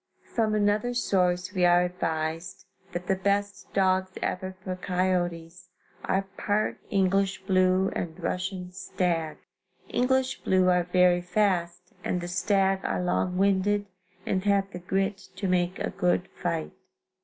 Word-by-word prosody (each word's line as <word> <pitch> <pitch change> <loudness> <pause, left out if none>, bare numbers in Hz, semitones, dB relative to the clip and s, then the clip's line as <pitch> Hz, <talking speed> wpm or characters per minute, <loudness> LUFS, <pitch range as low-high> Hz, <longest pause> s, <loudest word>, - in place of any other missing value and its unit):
From 220 -2 +1
another 210 +4 +1
source 180 -4 +1
we 185 -2 +1
are 175 0 +5
advised 165 -1 -3 0.3
that 175 0 -4
the 190 - +1
best 200 +1 -1
dogs 185 -1 +2
ever 185 +1 -3
for 185 -1 -3
coyotes, 180 -2 -2 0.4
are 190 +1 +1 0.2
part 210 +1 0
English 195 0 +1
blue 185 0 +3
and 165 -2 -4
Russian 180 0 -3
stag. 175 -3 -2 0.5
English 260 +1 +1
blue 185 -1 +3
are 180 -1 +3
very 180 0 +4
fast 180 -2 0
and 180 - -1
the 175 - -5
stag 195 +1 +2
are - - -1
long 180 0 0
winded 200 +1 +2 0.4
and 185 -1 0
have 200 -1 +2
the 180 - -6
grit 195 +2 -1 0.2
to 195 - -2
make 180 0 +1
a - - -2
good 180 -1 0
fight. 170 -3 -3
185 Hz, 140 wpm, -27 LUFS, 180-195 Hz, 0.5 s, are